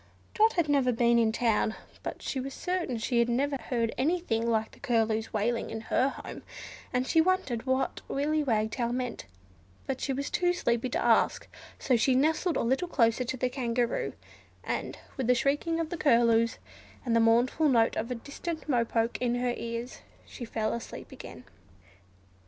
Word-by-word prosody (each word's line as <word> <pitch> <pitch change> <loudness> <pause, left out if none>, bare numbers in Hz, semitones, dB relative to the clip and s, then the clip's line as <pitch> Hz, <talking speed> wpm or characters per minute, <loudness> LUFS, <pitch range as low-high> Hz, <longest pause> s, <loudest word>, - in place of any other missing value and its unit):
Dot 440 +1 +4
had 345 -4 +1
never 275 -3 +3
been 235 0 +3
in 225 -1 +3
the - - -4
town, 220 -2 +1 0.3
but - - -6
she 270 - -2
was 270 +1 -5
certain 360 -9 -2
she 235 +2 0
had 235 0 +3
never 275 +4 +1
heard 235 -3 -2
anything 260 -7 0
like 220 -1 0
the - - -18
Curlew's 225 -4 0
wailing 225 +2 -1
in 225 - -4
her 255 +4 +1
home; - - -8 0.5
and 250 0 0
she 320 - +4
wondered 300 -9 0
what 260 +1 0
Willy 305 +2 0
Wagtail 230 -2 0
meant, 250 -1 -3 0.6
but 265 -1 -3
she 275 - -1
was 275 +2 -3
too 355 0 +2
sleepy 240 -7 0
to - - -1
ask: 230 -2 +3 0.3
so 255 - +1
she 250 +3 +3
nestled 315 +5 +2
a - - 0
little 265 +9 +1
closer 235 -6 +2
to 255 +2 -4
the 255 - +1
Kangaroo, 240 - -1 0.5
and - - -3 0.2
with 260 -3 -1
the 250 - +5
shrieking 290 +6 0
of 325 -1 -2
the 345 - -3
Curlews, 230 -5 +3 0.5
and 235 -2 +1
the - - +5
mournful 240 +7 +3
note 230 -3 +3
of 220 - -2
the 250 - -3
distant 310 +7 -6
Mo 245 -5 +2
poke 230 0 -1
in 245 -1 +1
her 245 0 0
ears, 235 +1 -5 0.3
she 240 - -8
fell 220 -1 -2
asleep 235 - -7
again. - - -10
245 Hz, 185 wpm, -29 LUFS, 230-280 Hz, 0.6 s, the